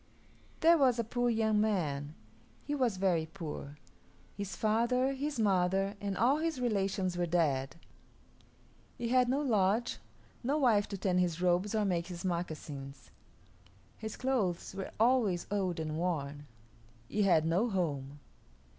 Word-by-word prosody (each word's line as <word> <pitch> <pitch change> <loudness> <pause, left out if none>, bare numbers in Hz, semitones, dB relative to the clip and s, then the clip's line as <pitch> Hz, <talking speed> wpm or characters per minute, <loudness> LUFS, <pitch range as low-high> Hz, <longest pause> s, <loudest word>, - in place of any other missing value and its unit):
There 335 0 +6
was 255 -4 +4
a 235 - +1
poor 245 +2 0
young 220 -2 +2
man. 155 -8 -1 0.5
He 290 - -2
was 250 -8 +1
very 175 -4 +1
poor. 155 -4 -7 0.6
His 200 -3 -5
father, 235 +6 +1
his 280 0 -3
mother, 195 -1 +2
and 200 -1 -2
all 255 +6 +4
his 320 -3 -2
relations 195 -6 0
were 175 - +1
dead. 145 -6 +1 1.2
He 235 -1 -3
had 250 0 +4
no 275 +3 +1
lodge, 220 -2 +1 0.4
no 275 +5 +1
wife 225 -8 +3
to 200 - -5
tan 185 -2 +1
his 175 -2 0
robes 180 +4 +1
or 215 -1 +2
make 175 -3 0
his 175 0 -7
moccasins. 150 -6 -5 0.8
His 220 -1 -7
clothes 225 -12 -1
were 195 0 -5
always 225 -7 +3
old 185 -4 -1
and 155 -1 -3
worn. 150 -4 -3 0.6
He 210 - -1
had 175 -6 +4
no 180 +9 +2
home. 145 -7 -2
195 Hz, 145 wpm, -32 LUFS, 170-235 Hz, 1.2 s, There